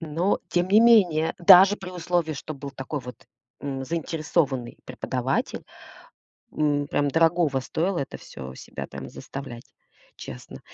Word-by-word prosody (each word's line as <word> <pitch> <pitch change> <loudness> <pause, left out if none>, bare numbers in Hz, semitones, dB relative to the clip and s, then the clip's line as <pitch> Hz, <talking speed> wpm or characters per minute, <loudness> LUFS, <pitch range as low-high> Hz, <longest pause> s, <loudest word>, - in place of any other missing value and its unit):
Но 165 +4 0
тем 175 +1 0
не 210 +3 +6
менее, 185 -9 +4
даже 185 +3 +8
при 185 -3 -8
условии, 175 -2 -1
что 155 +3 -7
был 140 0 -8
такой 135 +2 -5
вот, 125 -2 -9 0.4
м, 135 -2 -4
заинтересованный 155 -5 -2
преподаватель, - - -3 0.9
м. 145 -1 0
Прям 145 0 +1
дорогого 165 -2 +2
стоило 170 +7 -1
это 140 - -4
всё 65 -1 -10
себя - - -8
там - - -8
заставлять. 135 -4 -9 0.4
Честно. 60 - -10
155 Hz, 135 wpm, -25 LUFS, 135-175 Hz, 0.9 s, даже